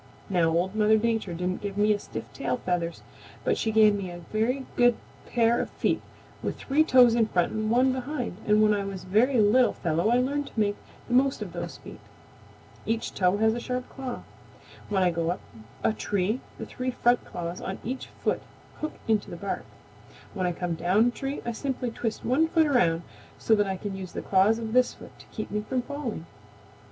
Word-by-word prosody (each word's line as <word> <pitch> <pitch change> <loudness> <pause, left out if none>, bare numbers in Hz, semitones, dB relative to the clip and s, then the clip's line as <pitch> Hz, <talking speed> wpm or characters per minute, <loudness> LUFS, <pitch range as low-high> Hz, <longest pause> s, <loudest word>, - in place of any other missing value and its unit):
"Now 170 -3 +3
Old 175 +4 +1
Mother 215 0 +4
Nature 220 -5 0
didn't 180 +2 -2
give 200 -1 -5
me 210 0 +4
stiff - - -7
tail - - -1
feathers, 175 -6 -2 0.4
but - - +2
she 220 - -1
gave 215 -1 +6
me 200 -2 -3
a 175 - -7 0.2
very 250 +5 0
good 245 -1 +5 0.4
pair 235 0 +3
of - - -4
feet - - 0 0.4
with - - -3
three 290 +3 +2
toes 250 -6 +6
in 230 -2 +3
front 175 -4 +1
and 215 0 -1
one 255 +3 +4
behind 255 -6 -4
and 210 0 +5
when 210 0 +5
I 200 -1 0
was 195 -2 -6
a - - -13
very 230 +7 +3
little 220 +4 +5
fellow 170 +4 0
I 240 - +4
learned 280 +3 0
to - - -6
make 205 -1 +2 0.3
the 245 - -3
most 265 +2 +3
of - - -9
those - - -5
feet. - - -11 0.8
Each 225 +1 -2
toe 185 +1 +2
has 220 +1 +3
a 240 - -3
sharp 250 +1 -3
claw. 265 -2 -6 0.7
When 195 -2 +2
I 180 - +3
go 165 0 -1
up 180 - -2 0.4
a 225 - +3
tree 205 +2 -1 0.2
the - - -5
three 255 0 -4
front 245 -1 +2
claws 170 +1 -5
on 190 - -4
each 260 +3 -4
foot - - -2 0.4
hook 310 - -3
into 220 -2 +1
the - - -6
bark. 200 +2 -4 0.7
When 185 -3 -1
I - - +1
come 175 0 -3
down 190 +8 +3
a - - -4
tree 270 +3 -4
I 235 - -1
simply 250 +1 -3
twist 225 -1 -4
one 285 +7 +3
foot 320 0 +3
around 175 - +2 0.3
so 225 - +2
that 205 -2 +3
I 190 -1 -2
can 200 +1 -5
use 190 -2 -7
the - - -4
claws 200 +3 +4
of 225 -1 -5
this 250 0 +3
foot - - -14
to - - -15
keep 215 - -6
me 210 +1 -1
from 250 +3 -2
falling. 260 - -5
220 Hz, 210 wpm, -27 LUFS, 190-250 Hz, 0.8 s, gave